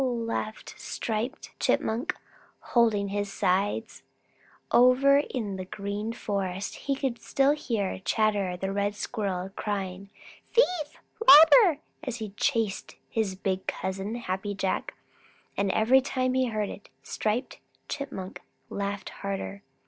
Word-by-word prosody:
laughed 230 -3 -3
Striped 230 +6 -4
Chipmunk, 245 +11 0 0.4
holding 220 -4 +2
his 205 0 -2
sides. 200 +5 0 0.7
Over 260 +3 +6
in 220 -9 -3
the 185 - -5
Green 205 +3 -4
Forest 195 -4 -3
he 275 - -2
could 265 -4 -2
still 275 +1 +3
hear 225 -11 -2
Chatterer 200 -2 +1
the 195 +2 -3
Red 200 +1 0
Squirrel 195 -4 -3
crying 195 -2 -4 0.5
"Thief! 480 - +8 0.6
Robber!" 320 - +9 0.2
as 255 -6 -3
he 220 -3 -5
chased 225 -2 -1 0.2
his 215 -4 0
big 190 0 -2
cousin, 190 +4 -3
Happy 205 -3 -3
Jack, 190 -1 -2 0.6
and 200 0 0
every 250 +5 +4
time 255 -1 -1
he 260 0 +2
heard 215 -3 -2
it, 205 - -10
Striped 215 - -2 0.3
Chipmunk 270 -10 -6 0.3
laughed 200 0 -3
harder. 200 0 -5
210 Hz, 120 wpm, -27 LUFS, 195-250 Hz, 0.7 s, Robber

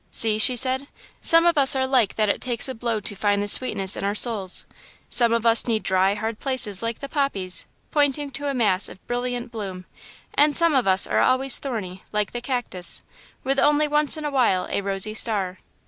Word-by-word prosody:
"See," 215 -1 +2
she 250 +3 +4
said, 260 +3 +1 0.3
"some 330 +1 +5
of 340 -3 +3
us 270 -1 +6
are 260 0 0
like 255 -6 +1
that 215 -1 0
it 200 - -1
takes 245 -1 -1
a 260 - -5
blow 230 -2 -3
to 205 - -2
find 205 0 0
the - - -4
sweetness 200 -4 +3
in - - -6
our 200 +1 -2
souls. 210 -5 +1 0.5
Some 235 -2 +4
of 230 0 -1
us 230 +2 +5
need 225 -2 -1
dry, 190 +1 +1
hard 220 +1 -5
places, 250 -8 -1
like 230 0 -4
the 275 - -6
poppies 200 - -3
" - - -42
pointing 290 -1 0
to 285 +3 -5
a 280 - -2
mass 205 -6 0
of 190 - -15
brilliant 245 0 -4
bloom 190 -5 -7 0.5
"and 295 0 +2
some 335 -2 +4
of 260 -6 +1
us 190 0 +5
are - - -1
always 260 0 +2
thorny, 195 -9 -6
like 210 -1 -2
the 240 - -6
cactus, 240 -9 -2 0.4
with 270 +1 -1
only 295 +1 +2
once 295 +1 0
in 305 - -6
a 295 - -3
while 230 -9 +1
a - - -1
rosy 195 +2 -1
star. 200 -5 -2
235 Hz, 215 wpm, -22 LUFS, 200-270 Hz, 0.5 s, us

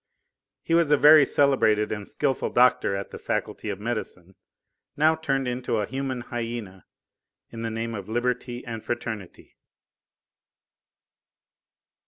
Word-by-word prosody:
He 165 - -2
was 165 -2 +4
a 150 - +5
very 150 0 +7
celebrated 120 -7 +2
and 105 -2 -5
skilful 135 -3 -1
doctor 125 -5 +3
at 100 0 -5
the - - -8
Faculty 110 - -3
of 100 -1 -4
Medicine, 105 -5 -5 0.6
now 155 +2 +4
turned 135 -4 -1
into 125 -2 -2
a 105 - 0
human 130 +1 -4
hyena 115 -6 -6 0.6
in 115 - -7
the 115 - -2
name 115 +1 -4
of 100 -2 -7
Liberty 120 +1 -2
and 115 -2 -6
Fraternity. 110 -5 -6
120 Hz, 130 wpm, -25 LUFS, 110-135 Hz, 0.6 s, very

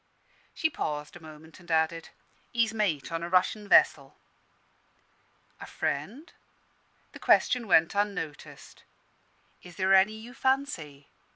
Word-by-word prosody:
She 320 - +1
paused 150 - -5
a - - -10
moment, 155 +1 -14
and 175 -1 -18
added, 160 0 0 0.4
"He's 230 -2 +1
mate 180 -12 -1
on 165 0 -3
a 170 - -5
Russian 185 +3 +1
vessel." 140 -7 +3 1.4
"A - - -9
friend?" 230 - -4 0.8
The - - -12
question 245 -3 +2
went 165 -3 +4
unnoticed. 200 -7 -5 0.8
"Is 180 -1 -14
there 190 0 +2
any 195 +2 +5
you 225 +3 -11
fancy?" 215 - -2
180 Hz, 120 wpm, -28 LUFS, 160-215 Hz, 1.4 s, any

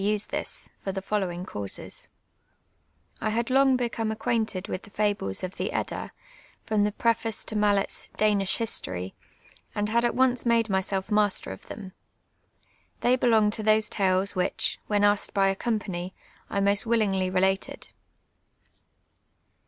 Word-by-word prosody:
»<e 210 +1 +2
this, 205 - -2
for 195 - -3
the 195 - -3
following 190 -3 -2
causes: 100 - -5 1.1
I 215 - 0
had 230 +3 -1
long 270 0 +5
become 230 -2 -1
accjuainted 220 -3 -1
with 185 - -3
the - - -15
fables 205 - 0
of 185 0 -5
the - - -1
Kdda, - - -3 0.6
from 215 -2 +2
tlie 210 0 -1
preface 230 -1 +1
to 220 - -4
Mallets 205 -1 +1
Danish 205 -3 +2
Ilistonj, 95 - -3 0.6
and 210 0 0
had 235 +2 +2
at 240 - +1
once 255 -1 +3
made 230 -2 +2
myself 190 +1 -1
master 210 -2 +1
of - - -8
tliem. 195 -3 -8 1.1
They 245 +1 +4
belonged 220 -4 +3
to 220 - -2
those 215 0 +3
tales 190 0 +1
which, 185 -2 0
when 205 -1 +2
asked 205 0 +2
by 195 -1 +4
a 195 - 0
company, 190 -5 -3 0.3
I 200 - 0
most 200 +3 +2
willingly 200 -5 +2
related. 190 +1 0
205 Hz, 145 wpm, -27 LUFS, 190-225 Hz, 1.1 s, long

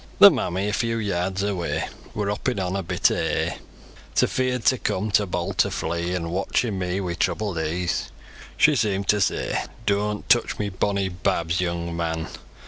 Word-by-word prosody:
Ther 200 - +11
mammy, 100 - -1
a 105 - -1
few 115 +1 0
yards 95 -2 -1
away, 95 -4 -1 0.3
Wor 105 -1 -1
hoppin' 105 +2 -1
on 90 0 -1
a 100 - 0
bit 85 - +2
o' - - 0
hay, - - -1 0.6
Too - - +5
feard 125 -2 -1
to 130 - +4
come, 105 +3 -1
too 100 0 +3
bold - - -3
to - - +4
flee; 85 +2 -2
An' 85 -2 -3
watchin 100 +3 0
me 90 +1 -1
wi' 90 -3 -2
troubled 100 0 -1
e'e, 85 +3 -2 0.7
Shoo 150 0 +5
seem'd 100 -5 0
to 105 -1 +4
say: 95 - 0 0.2
"Dooant 105 0 0
touch - - +3
my 105 -1 -1
bonny 100 +1 0
babs, 90 -2 0
young 85 -1 -2
man! 80 -1 -2
95 Hz, 180 wpm, -24 LUFS, 85-105 Hz, 0.7 s, Ther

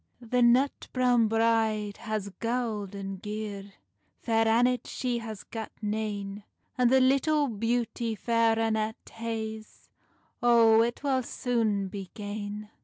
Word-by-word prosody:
"The 245 +1 0
nut 250 +4 +3
browne 245 -3 +3
bride 220 -2 +1
haes 215 -2 -3
gowd 230 -4 -2
and 195 -1 -6
gear, 210 -2 -6 0.5
Fair 225 -1 +2
Annet 245 +2 +2
she 245 -2 -2
has 220 -3 -7
gat 225 -2 -7
nane; 210 -1 -3 0.3
And 250 -2 +3
the 265 +1 +5
little 275 +3 +3
beauty 230 0 -1
Fair 230 +1 +2
Annet 220 -1 0 0.2
haes 220 -1 -6 0.5
O 230 -2 +6
it 235 +4 -1
wull 270 -2 +2
soon 225 -5 -1
be 195 -1 -7
gane." 210 0 -6
225 Hz, 125 wpm, -28 LUFS, 210-240 Hz, 0.5 s, O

